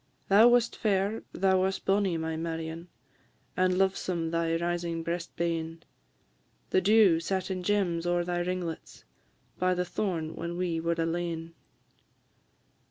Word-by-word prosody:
Thou 210 Hz, +4 st, +7 dB
wast 240 Hz, -1 st, +3 dB
fair, 205 Hz, +1 st, 0 dB
thou 190 Hz, -1 st, +2 dB
wast 190 Hz, +1 st, -1 dB
bonnie, 195 Hz, -3 st, +2 dB
my 160 Hz, 0 st, -3 dB
Marion, 165 Hz, +1 st, -4 dB, 0.7 s
And 185 Hz, 0 st, +2 dB
lovesome 185 Hz, -3 st, 0 dB
thy 165 Hz, 0 st, 0 dB
rising 170 Hz, -1 st, -2 dB
breast 170 Hz, +1 st, -4 dB
bane; 165 Hz, -1 st, -2 dB, 0.9 s
The 185 Hz, -, +4 dB
dew 200 Hz, -4 st, +5 dB
sat 190 Hz, +2 st, -2 dB
in 185 Hz, -1 st, -3 dB
gems 180 Hz, -3 st, 0 dB
ower 175 Hz, 0 st, +1 dB
thy 175 Hz, 0 st, -2 dB
ringlets, 175 Hz, -2 st, -4 dB, 0.6 s
By 185 Hz, 0 st, +2 dB
the 180 Hz, 0 st, -1 dB
thorn 170 Hz, -4 st, -3 dB
when 170 Hz, +1 st, -5 dB
we 175 Hz, -2 st, -1 dB
were 170 Hz, +1 st, 0 dB
alane. 165 Hz, 0 st, -2 dB
175 Hz, 135 wpm, -29 LUFS, 165-190 Hz, 0.9 s, Thou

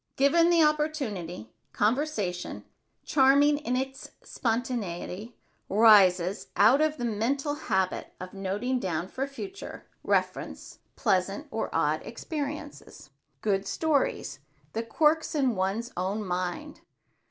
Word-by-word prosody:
Given 330 Hz, +5 st, +4 dB
the 340 Hz, -2 st, +5 dB
opportunity, 270 Hz, -, -1 dB, 0.2 s
conversation, 210 Hz, -, -1 dB, 0.4 s
charming 285 Hz, +1 st, +4 dB
in 250 Hz, -4 st, -2 dB
its 265 Hz, +1 st, -4 dB
spontaneity, 225 Hz, -3 st, -3 dB, 0.3 s
rises 195 Hz, -3 st, +5 dB
out 270 Hz, +6 st, +5 dB
of 310 Hz, 0 st, +1 dB
the 240 Hz, -, -3 dB
mental 255 Hz, +7 st, -1 dB
habit 190 Hz, -10 st, -1 dB
of 185 Hz, 0 st, -8 dB
noting 200 Hz, +7 st, -2 dB
down 175 Hz, -4 st, -2 dB
for 270 Hz, +5 st, -3 dB
future 385 Hz, +8 st, -8 dB, 0.2 s
reference -, -, -2 dB, 0.2 s
pleasant -, -, 0 dB
or -, -, -2 dB
odd -, -, +1 dB
personal -, -, -9 dB
experiences, 300 Hz, -1 st, -6 dB, 0.3 s
good 195 Hz, -2 st, 0 dB
stories, 310 Hz, -4 st, 0 dB, 0.3 s
the 225 Hz, -, -1 dB
quirks 310 Hz, +8 st, +1 dB
in 265 Hz, -5 st, +2 dB
one's 195 Hz, +6 st, -1 dB
own 195 Hz, +4 st, -2 dB
mind. 185 Hz, +12 st, -4 dB
240 Hz, 115 wpm, -28 LUFS, 195-290 Hz, 0.4 s, the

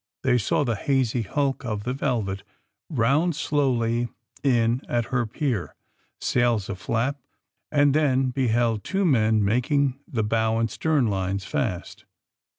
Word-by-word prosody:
They 125 Hz, -2 st, +3 dB
saw 120 Hz, +8 st, +1 dB
the 120 Hz, -4 st, 0 dB
hazy 125 Hz, +1 st, 0 dB
hulk 135 Hz, +6 st, -1 dB
of 105 Hz, -4 st, -3 dB
the 125 Hz, +3 st, -2 dB
^^ -, -, -5 dB
Velvet" 110 Hz, -9 st, -1 dB, 0.5 s
round 145 Hz, +6 st, +2 dB
slowly 120 Hz, -6 st, 0 dB, 0.3 s
in 120 Hz, -2 st, +2 dB
at 120 Hz, -1 st, +1 dB
her 120 Hz, -2 st, +1 dB
pier, 120 Hz, -, -2 dB, 0.4 s
sails 120 Hz, -5 st, +1 dB
aflap, 115 Hz, +8 st, -1 dB, 0.5 s
and 145 Hz, -2 st, +4 dB
then 135 Hz, -4 st, +2 dB
beheld 120 Hz, -4 st, +1 dB
two 195 Hz, 0 st, 0 dB
men 110 Hz, -, +3 dB
making 130 Hz, +5 st, +1 dB
the 115 Hz, -4 st, -1 dB
bow 110 Hz, +1 st, +1 dB
and 115 Hz, 0 st, 0 dB
stern 155 Hz, -5 st, +1 dB
lines 95 Hz, -2 st, -1 dB
fast. 95 Hz, -7 st, -3 dB
120 Hz, 140 wpm, -25 LUFS, 110-135 Hz, 0.5 s, and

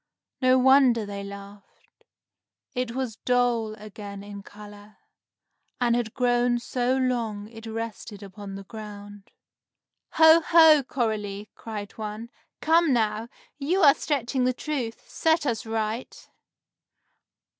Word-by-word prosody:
No 255 Hz, 0 st, +5 dB
wonder 255 Hz, -3 st, +5 dB
they 200 Hz, -1 st, -6 dB
laughed. 200 Hz, 0 st, -13 dB, 0.7 s
It 250 Hz, -2 st, -3 dB
was 255 Hz, -4 st, -3 dB
dull 240 Hz, -3 st, 0 dB
again 205 Hz, -1 st, -9 dB
in 205 Hz, 0 st, -9 dB
color, 205 Hz, 0 st, -14 dB, 0.8 s
and 240 Hz, -1 st, +2 dB
had 235 Hz, -2 st, -2 dB
grown 245 Hz, -1 st, +2 dB
so 245 Hz, +1 st, -1 dB
long 230 Hz, -5 st, -1 dB
it 225 Hz, 0 st, -11 dB
rested 220 Hz, -2 st, -6 dB
upon 195 Hz, 0 st, -9 dB
the 195 Hz, -, -8 dB
ground. 205 Hz, -1 st, -10 dB, 0.8 s
"Ho, 320 Hz, +1 st, +7 dB
ho, 320 Hz, -3 st, +7 dB
Coralie!" 215 Hz, -5 st, -3 dB
cried 210 Hz, -3 st, -7 dB
one. 215 Hz, +2 st, -6 dB, 0.3 s
"Come, 325 Hz, 0 st, +3 dB
now! 225 Hz, 0 st, 0 dB, 0.3 s
You 340 Hz, +8 st, 0 dB
are 280 Hz, -2 st, +8 dB
stretching 270 Hz, -4 st, -1 dB
the 255 Hz, 0 st, +2 dB
truth! 250 Hz, -5 st, -5 dB
Set 320 Hz, -1 st, +1 dB
us 235 Hz, -2 st, -2 dB
right!" 220 Hz, +2 st, -4 dB
230 Hz, 120 wpm, -25 LUFS, 210-255 Hz, 0.8 s, are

